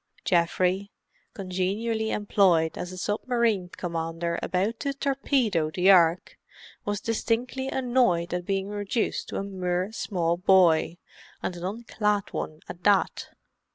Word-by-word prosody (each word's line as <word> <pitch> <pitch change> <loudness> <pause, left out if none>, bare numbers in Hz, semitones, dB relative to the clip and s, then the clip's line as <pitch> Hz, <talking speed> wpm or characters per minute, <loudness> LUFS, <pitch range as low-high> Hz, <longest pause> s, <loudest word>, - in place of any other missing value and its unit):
Geoffrey, 185 +3 +1 0.5
congenially 200 +4 -2
employed 190 -7 +2
as 180 - -5
a 185 - -8
submarine 215 -1 0
commander 170 -1 -3
about 200 +5 -1
to 280 -1 -2
torpedo 265 - +1
the 180 +4 +4
Ark, 170 -2 +3 0.5
was 205 -1 -1
distinctly 240 +3 -1
annoyed 240 -11 +1
at 180 0 -2
being 195 +1 -2
reduced 205 +2 -2
to - - -7
a - - -2
mere 185 0 -2
small 170 -6 -1
boy, 175 -3 +4 0.5
and 180 - -2
an 175 - -8
unclad 210 0 -1
one 155 +1 -5
at 175 - -9
that. 205 -2 +2
190 Hz, 125 wpm, -26 LUFS, 175-220 Hz, 0.5 s, the